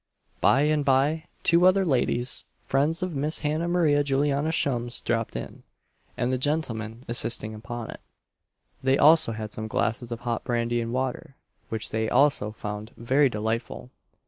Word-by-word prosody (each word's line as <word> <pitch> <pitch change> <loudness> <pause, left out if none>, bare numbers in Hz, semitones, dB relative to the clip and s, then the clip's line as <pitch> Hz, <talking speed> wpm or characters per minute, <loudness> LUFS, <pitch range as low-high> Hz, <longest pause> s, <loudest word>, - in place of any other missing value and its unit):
By 135 - +4
and 150 0 +2
by 140 +4 +2 0.2
two 170 +2 +5
other 190 +1 +4
ladies, 125 -4 +1 0.2
friends 150 +6 0
of 185 -2 -3
Miss 150 +3 -1
Hannah 155 +3 -1
Maria 160 -5 +3
Juliana 140 +2 +1
Shum's, 120 -6 -1
dropped 115 -1 -2
in, - - -7 0.6
and 125 +2 0
the 130 - 0
gentleman 120 -5 -2
insisting 115 -2 -2
upon 115 +1 -7
it, - - -11 0.8
they 130 +1 +2
also 155 -4 +6
had 110 -1 -6
some 110 +1 -5
glasses 115 +2 -2
of 115 - -5
hot 120 -2 -2
brandy 120 0 0
and 115 0 -4
water, 130 +1 -3 0.3
which 110 -1 -4
they 110 0 -1
also 140 -7 +3
found 105 +1 -7
very 135 +4 +3
delightful. 105 - -4
130 Hz, 155 wpm, -26 LUFS, 115-145 Hz, 0.8 s, also